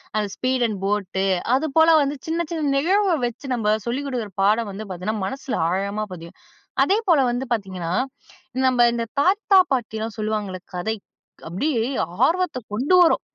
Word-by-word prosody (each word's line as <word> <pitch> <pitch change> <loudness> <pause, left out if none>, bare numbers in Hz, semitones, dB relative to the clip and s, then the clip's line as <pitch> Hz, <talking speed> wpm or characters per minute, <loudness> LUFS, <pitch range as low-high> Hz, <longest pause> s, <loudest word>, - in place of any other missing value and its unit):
அந்த 210 -1 +1
speed 255 -1 +1
and 205 -3 -4
boat 195 -2 -1 0.3
அது 280 +4 0
போல 320 +1 +7
வந்து 280 +1 -2
சின்ன, 330 +1 0
சின்ன 315 -3 -1
நிகழ்வ 380 +7 +2 0.2
வச்சு 240 +4 -9
நம்ம 225 -3 -2 0.2
சொல்லிக் 265 +4 -2
கொடுக்குற 230 -6 -4
பாடம் 215 +1 +2
வந்து 210 - -6
பார்த்தீங்கன்னா, 195 +4 -3
மனசுல 265 +3 -4
ஆழமா 200 +3 -1
பதியும். 170 +1 -11 0.4
அதேபோல 390 -6 +3
வந்து 245 +2 -2
பார்த்தீங்கன்னா, 185 -6 -2 0.7
நம்ம 245 -2 +4
இந்த 235 0 -2 0.2
தாத்தா, 390 +5 +4
பாட்டி 235 -4 -1
எல்லாம் 220 0 -4
சொல்லுவாங்கல்ல 210 -3 -2
கதை. 180 +5 -2 0.5
அப்பிடியே 230 - -1 0.5
ஆர்வத்த 350 -3 0 0.2
கொண்டு 275 +12 +2
வரும். 330 - +4
235 Hz, 155 wpm, -22 LUFS, 205-290 Hz, 0.7 s, போல